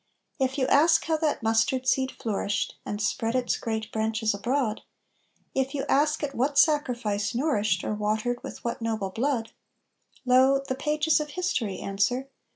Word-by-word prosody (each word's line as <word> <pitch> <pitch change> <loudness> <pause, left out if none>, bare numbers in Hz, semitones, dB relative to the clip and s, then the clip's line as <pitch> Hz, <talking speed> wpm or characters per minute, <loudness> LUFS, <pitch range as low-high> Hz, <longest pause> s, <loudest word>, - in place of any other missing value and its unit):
If 265 +1 0
you 260 - +2
ask 325 +5 +4
how 320 -1 +1
that 305 -6 -1
mustard 225 +4 +1
seed 260 0 +2
flourished, 205 -2 -2
and 205 - -3
spread 225 +2 -1
its 250 -1 +1
great 220 -1 -4
branches 220 0 0
abroad, 230 +2 -1 0.7
If 270 +2 -1
you 275 - -2
ask 300 +2 +2
at 280 -1 -2
what 275 +3 0
sacrifice 245 -8 +2
nourished 215 - +1
or - - -2
watered 215 +3 -1
with - - -9
what 235 0 -3
noble 220 -4 -2
blood? 235 +1 -1 0.7
Lo! 260 +2 +4
the - - 0
pages 300 +3 +1
of 300 0 -4
history 255 - -2
answer. 245 +7 -1
250 Hz, 160 wpm, -26 LUFS, 220-280 Hz, 0.7 s, ask